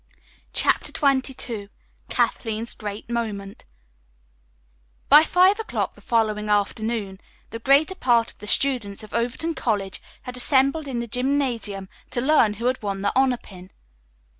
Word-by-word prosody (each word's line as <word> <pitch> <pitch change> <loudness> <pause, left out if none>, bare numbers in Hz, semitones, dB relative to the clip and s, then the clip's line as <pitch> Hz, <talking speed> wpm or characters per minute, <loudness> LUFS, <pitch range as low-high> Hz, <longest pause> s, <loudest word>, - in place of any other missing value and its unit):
CHAPTER - - +2
XXII 260 -7 -1 0.4
KATHLEEN'S 225 0 0
GREAT 205 -1 -7
MOMENT 215 -4 -4 1.4
By 300 +2 +9
five 370 +5 +4
o'clock 445 - -2
the - - -19
following 215 -3 0
afternoon 205 -1 -1 0.3
the 230 - -6
greater 280 +8 +3
part 240 -10 +2
of - - -28
the 210 - -9
students 225 -5 +1
of 215 - -12
Overton 245 +8 -1
College 205 - -2 0.2
had 250 -1 -7
assembled 275 +4 +2
in 245 -3 -3
the 235 - -5
gymnasium 245 -6 -1 0.2
to 255 - -1
learn 245 -5 +3
who 230 +3 -6
had 255 +1 0
won 200 -2 -3
the 200 - +1
honor 260 -1 +3
pin. 185 -4 -14
235 Hz, 140 wpm, -23 LUFS, 210-270 Hz, 1.4 s, By